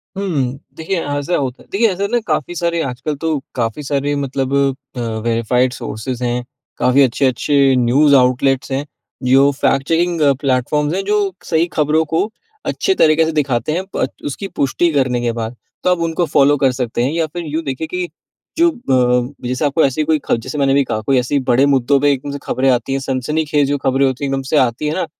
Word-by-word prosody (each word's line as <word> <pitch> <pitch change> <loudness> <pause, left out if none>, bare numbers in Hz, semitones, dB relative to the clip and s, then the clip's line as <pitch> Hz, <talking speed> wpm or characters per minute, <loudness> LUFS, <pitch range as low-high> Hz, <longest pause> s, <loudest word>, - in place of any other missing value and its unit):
हुँ। 145 -10 -1 0.2
देखिए 165 +2 -2
ऐसा 145 +4 -1
होता 130 -2 -3
है - - -26
देखिए 225 +3 +3
ऐसा 195 +2 -2
ना, 240 - +2
काफ़ी 155 +2 -1
सारे 170 0 0
आजकल 135 +3 -3
तो 160 +1 -1 0.2
काफ़ी 115 +4 -2
सारे 145 +1 -1
मतलब 135 -1 -2 0.4
अ, - - -5
वेरिफाइड 115 +2 0
सोर्सेज़ 120 +3 -5
हैं, 120 0 -1 0.3
काफ़ी 130 +3 +3
अच्छे-अच्छे 135 +2 +2
न्यूज़ 135 +4 +4
आउटलेट्स 130 +1 +2
हैं, 135 +2 -1 0.4
जो 135 +3 +5
फैक्ट 135 +1 +2
चेकिंग 170 0 +1 0.2
प्लेटफॉर्म्स 145 +3 0
हैं, 195 +1 -1
जो 205 -1 +1
सही 165 +1 +1
खबरों 155 +1 +2
को 205 +6 +1 0.4
अच्छे 385 - 0
तरीके 155 - +4
से 160 - -1
दिखाते 140 -3 0
हैं 180 +4 -1
पर - - +1 0.2
उसकी 145 +7 -4
पुष्टि 165 +5 +2
करने 130 -3 +1
के 120 -1 0
बाद। 115 +1 -5 0.3
तो 180 - +2
आप 180 - +2
उनको 165 +2 0
फॉलो 145 -1 +3
कर 135 -1 +3
सकते 120 -2 -2
हैं 135 - 0
या 165 -1 +1
फिर 175 -1 -4
यूँ 155 +2 -3
देखिए 140 +2 -4
कि 180 +1 -3 0.5
जो 340 +1 +5
अ, 125 - +1
जैसे 130 +4 -1
आपको 145 +3 +2
ऐसी 140 +3 0
कोई 155 0 +1
ख - - +2
जैसे 130 +3 -5
मैंने 140 0 +3
कहा, 110 - -2
कोई 130 +4 +1
ऐसे 130 +3 0
बड़े 130 +3 +4
मुद्दों 140 0 +3
पे 145 0 +3
एकदम 140 +1 -3
से 140 - -4
खबरें 135 +1 0
आती 120 +2 -1
हैं, 135 - 0
सनसनीखेज़ 145 +2 0
जो 145 - +1
खबरें 135 0 +1
होती 130 +1 -2
हैं, 140 - -2
एकदम 135 0 -1
से 155 - +3
आती 130 +3 +1
है 150 - -1
ना, 185 - -1
140 Hz, 205 wpm, -17 LUFS, 130-155 Hz, 0.5 s, जो